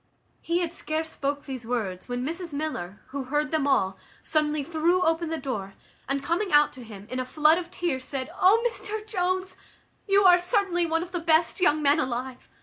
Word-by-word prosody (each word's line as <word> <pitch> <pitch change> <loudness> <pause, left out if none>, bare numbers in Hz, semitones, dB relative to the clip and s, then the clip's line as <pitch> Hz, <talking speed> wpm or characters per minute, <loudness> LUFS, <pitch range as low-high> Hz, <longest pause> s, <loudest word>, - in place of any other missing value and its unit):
He 340 +1 0
had 340 -1 -2
scarce 320 -1 -3
spoke 285 +1 -3
these 260 -3 -6
words, 220 -5 -3
when 245 +1 -2
Mrs 335 +1 -4
Miller, 245 - -4
who 275 -1 -4
heard 295 +3 -1
them 310 -3 +1
all, 190 -8 +1 0.2
suddenly 305 -1 +1
threw 340 +4 +1
open 325 0 +1
the 325 - -2
door, 200 -10 -5 0.3
and 275 0 0
coming 345 +6 -1
out 295 0 +5
to 255 - -10
him, 205 -3 -10
in 255 - -2
a - - 0
flood 305 +5 +3
of 350 -1 -7
tears, 345 -8 -2
said, 260 -1 -4
"O 445 +6 +5
Mr 430 -2 -5
Jones! 370 -2 -1 0.5
you 400 0 +4
are 360 -2 +7
certainly 355 -2 +1
one 325 +1 0
of 355 - -10
the 355 - -2
best 330 +1 +2
young 305 -3 +3
men 285 +2 +4
alive. 255 -2 -4
310 Hz, 200 wpm, -26 LUFS, 265-350 Hz, 0.5 s, are